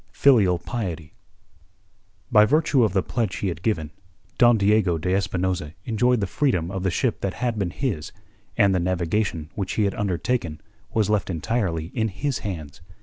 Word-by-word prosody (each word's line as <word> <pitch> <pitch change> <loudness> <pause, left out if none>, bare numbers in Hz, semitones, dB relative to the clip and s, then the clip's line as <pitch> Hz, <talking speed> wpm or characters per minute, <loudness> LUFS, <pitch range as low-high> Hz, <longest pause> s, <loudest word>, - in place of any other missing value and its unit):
FILIAL 105 -10 +4
PIETY 85 -6 -5 1.2
By 105 -3 +7
virtue 150 0 +3
of 110 - +1
the 95 -2 +2
pledge 110 -8 -2
he 95 +3 -2
had 85 -1 -5
given, 80 -8 -1 0.5
Don 120 -1 +6
Diego 100 -4 +3
de 90 +3 -1
Espinosa 95 -4 -1
enjoyed 120 0 +2
the - - +1
freedom 90 - 0
of 95 -1 -3
the 95 - +1
ship 115 +6 -1
that 100 -1 -2
had 120 -2 -2
been 95 -3 0
his, 95 - -3 0.5
and 100 -1 +4
the 95 - +2
navigation 90 -1 -1
which 95 -2 -3
he 110 - +1
had 100 -1 +1
undertaken 95 -3 -2 0.3
was 105 -2 +1
left 105 -3 0
entirely 85 -2 -2
in 110 -2 0
his 130 +7 -2
hands. 80 -8 -6
100 Hz, 170 wpm, -24 LUFS, 85-110 Hz, 1.2 s, By